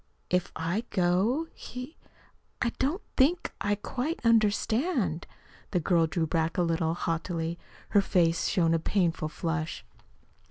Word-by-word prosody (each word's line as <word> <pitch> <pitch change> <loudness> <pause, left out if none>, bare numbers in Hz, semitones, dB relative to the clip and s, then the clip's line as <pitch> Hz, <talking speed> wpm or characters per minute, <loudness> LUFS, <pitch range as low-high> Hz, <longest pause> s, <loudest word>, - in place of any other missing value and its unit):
"If 180 0 +1
I 170 +7 -1
go, 195 - +2
he 255 +5 -8 0.6
I 235 - +1
don't 305 +10 0
think 315 +7 +3
I 205 0 +2
quite 255 - -3
understand." 225 - +2 0.4
The 180 - +1
girl 170 -1 +3
drew 165 0 0
back 165 +2 0
a 180 - +3
little 165 -1 0
haughtily. 165 0 -2 0.3
Her 205 - +5
face 170 -5 +2
showed 170 -4 +2
a 165 - +2
painful 165 -3 0
flush. 165 +1 -3
180 Hz, 130 wpm, -29 LUFS, 165-230 Hz, 0.6 s, Her